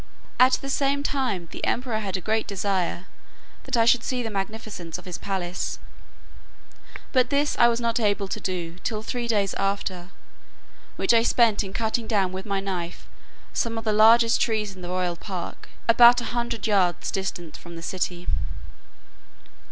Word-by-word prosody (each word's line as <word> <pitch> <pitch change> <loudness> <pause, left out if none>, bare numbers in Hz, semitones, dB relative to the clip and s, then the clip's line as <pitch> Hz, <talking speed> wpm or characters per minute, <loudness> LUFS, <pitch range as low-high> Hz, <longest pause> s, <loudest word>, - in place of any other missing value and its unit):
At 255 +1 +7
the 275 - 0
same 280 +1 +1
time 250 -12 -1
the - - -8
emperor 240 -3 0
had 195 -3 -2
a - - -7
great 220 +3 0
desire 190 -3 -1 0.6
that 265 -2 -1
I 230 - +4
should 235 0 +4
see 250 -2 -2
the 225 - -4
magnificence 195 -4 -5
of 180 - -13
his 180 -2 -6
palace; 185 -2 -3 1.3
but 255 -2 +3
this 290 +1 +1
I 235 - +8
was 235 0 +1
not 235 0 0
able 205 -2 +1
to - - -3
do 175 -2 -4
till 215 +1 -3
three 240 +1 -3
days 205 -4 +1
after, 195 -2 -2 0.9
which - - +2
I 230 - +6
spent 230 -2 +3
in 190 - -7
cutting 225 +2 -1
down 195 -5 +1
with 190 +2 -6
my 200 -1 0
knife 180 -3 -4 0.5
some 230 -2 -1
of 225 - -4
the 215 -1 +1
largest 230 +2 +6
trees 215 -3 0
in 185 - -12
the 175 - -6
royal 180 -1 -1
park, 185 -3 -7 0.2
about 240 +1 +8
a - - -4
hundred 235 -1 -2
yards 190 -5 +1
distant 175 -4 -4
from 170 -1 -10
the 165 - -8
city. 180 -1 -3
210 Hz, 175 wpm, -25 LUFS, 185-235 Hz, 1.3 s, I